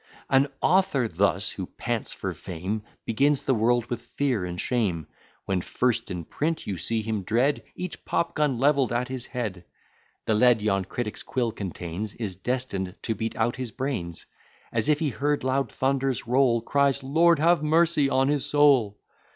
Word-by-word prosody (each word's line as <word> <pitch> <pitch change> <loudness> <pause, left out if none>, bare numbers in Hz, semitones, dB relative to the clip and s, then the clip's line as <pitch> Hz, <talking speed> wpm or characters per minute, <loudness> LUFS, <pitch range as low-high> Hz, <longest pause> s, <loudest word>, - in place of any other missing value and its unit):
An 135 +1 +5 0.2
author 180 -9 +3
thus, 95 0 +1
who 95 -2 -6
pants 120 -2 -3
for - - -4
fame, 95 +4 -4 0.2
Begins 140 +5 +2
the 135 - +2
world 120 +1 +2
with 120 -1 -4
fear 125 -3 -1
and 90 0 -5
shame; 95 - 0 0.4
When 95 -2 0
first 120 +4 0
in 90 -3 -5
print 160 - -2
you 100 - -3
see 110 +7 -1
him 110 -2 -2
dread 120 +9 +1
Each 180 -1 -6
pop 170 - -1
gun 150 -5 +1
levell'd 140 -1 +3
at 120 +1 -1
his 130 -2 -4
head: 105 -8 -4 0.6
The 110 - +2
lead 120 +1 +5
yon 100 -3 0
critic's 105 +2 -4
quill 120 -3 -1
contains, 95 0 -5
Is 105 -6 -4
destined 95 -4 -3
to 115 - 0
beat 110 +2 -4
out 115 +2 0
his 130 -2 -3
brains: 115 -12 -4 0.5
As 115 +2 +1
if 150 - +4
he 155 -1 0
heard 145 +2 -1
loud 135 +1 0
thunders 135 -2 0
roll, 125 -1 +3
Cries, 140 +2 +1
Lord 165 +5 +4
have 170 +1 +3
mercy 160 -2 +3
on 135 0 +2
his 145 -1 +2
soul! 135 -9 +4
120 Hz, 175 wpm, -26 LUFS, 105-140 Hz, 0.6 s, An